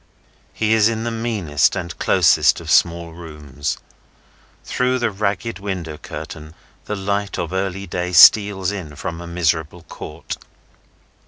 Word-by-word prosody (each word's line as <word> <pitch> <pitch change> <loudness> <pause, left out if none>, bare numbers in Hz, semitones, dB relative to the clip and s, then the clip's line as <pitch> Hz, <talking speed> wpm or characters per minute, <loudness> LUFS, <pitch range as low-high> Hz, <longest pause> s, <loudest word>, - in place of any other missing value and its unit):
He 110 0 +1
is 110 0 +4
in 110 -1 -3
the 120 - -2
meanest 110 -11 0
and 85 -3 -5
closest - - +4
of - - -5
small 85 -1 +2
rooms. 75 -4 -5 0.9
Through 125 0 0
the 120 -3 0
ragged 105 +3 -2
window 90 -6 -5
curtain, 75 +1 -8 0.3
the 105 - -3
light 100 +1 -2
of 85 +1 -3
early 95 +1 -2
day 90 0 -3
steals 100 -2 +7
in 85 -8 -7
from 85 +4 -5
a 85 - -8
miserable 85 -1 -1
court. 75 -1 -8
90 Hz, 140 wpm, -20 LUFS, 80-105 Hz, 0.9 s, steals